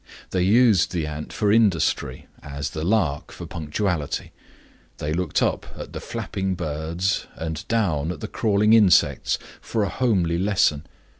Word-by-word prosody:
They 90 - +1
used 105 0 +4
the 85 -3 -1
ant 75 0 -6
for 105 -2 +1
industry 105 -7 +2 0.2
as 70 0 -5
the 80 - -4
lark 90 -7 0
for - - -8
punctuality; 80 0 -3 0.7
they 75 +1 -3
looked 85 -2 0
up - - -1
at - - -8
the - - -4
flapping 95 -1 -3
birds 85 +3 -2
and 80 -1 -4
down 85 -9 0
at - - -7
the 110 - -5
crawling 105 0 +2
insects 105 -6 +4 0.2
for 110 - -1
a 100 - -1
homely 90 -9 +1
lesson. 95 -7 +1
90 Hz, 150 wpm, -23 LUFS, 80-105 Hz, 0.7 s, used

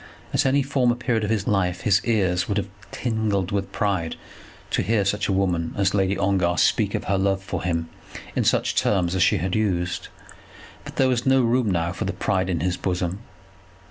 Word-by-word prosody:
At - - +2
any 140 +1 +3
former 130 -3 +1
period 120 -2 -1
of 105 - -1
his 110 -3 0
life 90 -3 0
his 100 -2 +3
ears 95 -6 +1
would 100 - -1
have 100 - -1 0.2
tingled 110 -5 -1
with 100 -1 -2
pride 95 -6 -1 0.6
to - - +1
hear 110 -3 +1
such 100 +1 0
a - - 0
woman 90 -4 0
as 100 -1 +2
Lady 95 -1 +1
Ongar 95 -3 +1
speak - - +2
of - - -2
her 100 -1 0
love 95 0 0
for 95 -3 -4
him 85 -2 -1 0.5
in - - +1
such - - +2
terms 90 -3 +1
as 95 - 0
she 90 - +4
had 90 +2 -2
used; 90 -5 -1 0.8
but - - -10
there 135 - +3
was 125 0 0
no 135 -1 +4
room 120 -1 +2
now 85 -2 0
for - - -4
pride 95 0 -1
in 85 -4 -1
his 90 +1 0
bosom. 90 0 -2
95 Hz, 200 wpm, -23 LUFS, 90-110 Hz, 0.8 s, she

